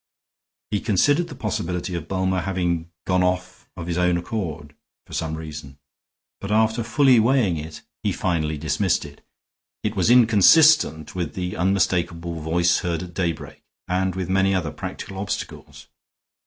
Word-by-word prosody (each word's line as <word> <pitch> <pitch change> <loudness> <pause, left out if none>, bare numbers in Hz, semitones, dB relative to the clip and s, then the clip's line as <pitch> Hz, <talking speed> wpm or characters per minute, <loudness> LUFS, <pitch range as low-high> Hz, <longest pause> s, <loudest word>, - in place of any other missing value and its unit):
He 105 - +1
considered 145 - +2
the 150 - -9
possibility 90 -5 -3
of 85 -2 -4
Bulmer 95 0 0
having 85 -3 -2 0.2
gone 90 -1 +2
off 90 0 -2
of 85 - -5
his 85 0 -2
own 90 -1 +2
accord, 85 -6 -5 0.3
for - - -14
some 80 -1 -2
reason; 75 -3 -8 0.6
but 100 - -6
after 110 +1 +2
fully 125 +2 +4
weighing 115 -6 +3
it 75 0 -8 0.2
he - - 0
finally 80 -4 -1
dismissed 80 +5 0
it. 70 0 -13 0.6
It 105 0 -2
was 95 +1 +2
inconsistent 120 - +5
with 85 -4 -4
the 90 -1 -3
unmistakable 85 -3 0
voice 85 +2 +2
heard 85 -1 -2
at 90 -1 -10
daybreak, 85 -2 -3 0.3
and 95 0 0
with 95 -2 -3
many 95 +1 +2
other 80 -5 -1
practical 95 -1 -7
obstacles. 100 0 -6
90 Hz, 150 wpm, -23 LUFS, 85-100 Hz, 0.6 s, inconsistent